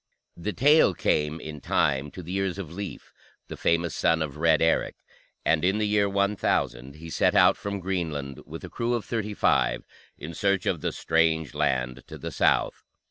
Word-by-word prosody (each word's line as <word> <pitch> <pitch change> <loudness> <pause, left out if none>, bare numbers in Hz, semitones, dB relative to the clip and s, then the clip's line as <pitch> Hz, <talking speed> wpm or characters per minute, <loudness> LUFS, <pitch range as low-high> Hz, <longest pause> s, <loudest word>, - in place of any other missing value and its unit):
The 85 +5 -4
tale 145 - +4
came, 75 +1 0
in 75 -2 -8
time, 70 0 +1
to 90 - -9
the 90 +3 -6
ears 95 -1 -1
of 85 -5 -7
Leif, 100 +2 -7 0.4
the - - -6
famous 85 0 0
son 80 -1 +2
of 75 -1 -6
Red 80 0 +3
Eric, 80 0 +1 0.5
and 80 -1 +2
in 95 +3 +2
the 110 - +1
year 105 -1 +2
1000 70 -10 0
he 80 +2 -10
set - - +2
out - - +6
from 100 0 -4
Greenland, 80 -8 -3
with - - -8
a - - -7
crew 120 +1 -1
of 115 - -4
thirty 105 -3 -3
five, - - +2 0.3
in 80 +3 -8
search 100 +2 0
of 85 -5 0
the - - -1
strange 80 -2 +1
land 65 0 -1
to - - -9
the - - -6
south. - - +1
85 Hz, 190 wpm, -26 LUFS, 75-100 Hz, 0.5 s, out